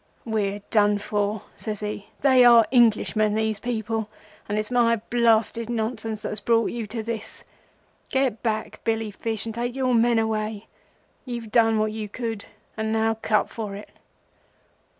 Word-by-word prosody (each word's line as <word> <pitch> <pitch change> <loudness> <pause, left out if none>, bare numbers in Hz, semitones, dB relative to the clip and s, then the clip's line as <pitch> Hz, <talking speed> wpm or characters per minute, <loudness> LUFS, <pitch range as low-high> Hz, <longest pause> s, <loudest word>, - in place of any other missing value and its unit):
"'We're 205 -3 -1
done 205 -1 +4
for,' 205 0 -2
says 215 -2 -5
he. 210 -1 -5
'They 260 -2 +6
are 235 -2 +8
Englishmen, 215 -3 +3
these 220 -1 0
people,—and 220 -2 -4
it's 215 +2 -2
my 235 -1 +4
blasted 230 0 +1
nonsense 220 -2 -3
that - - -2
has 210 - -5
brought 230 -1 +2
you 235 -2 -4
to 220 +1 -4
this. 225 -1 -6 0.7
Get 265 -5 0
back, 220 -2 -2
Billy 225 -1 -1
Fish, 220 +1 -3
and 225 - -4
take 240 +2 -3
your 260 -2 +1
men 235 0 +4
away; 220 -1 -1 0.6
you've 235 -4 -6
done 225 -1 +4
what 215 0 +1
you 215 -1 -5
could, 225 -2 -4 0.3
and 220 0 -2
now 225 0 +2
cut 215 -1 +2
for 210 -3 -6
it. 205 - -10
220 Hz, 155 wpm, -24 LUFS, 215-235 Hz, 0.7 s, are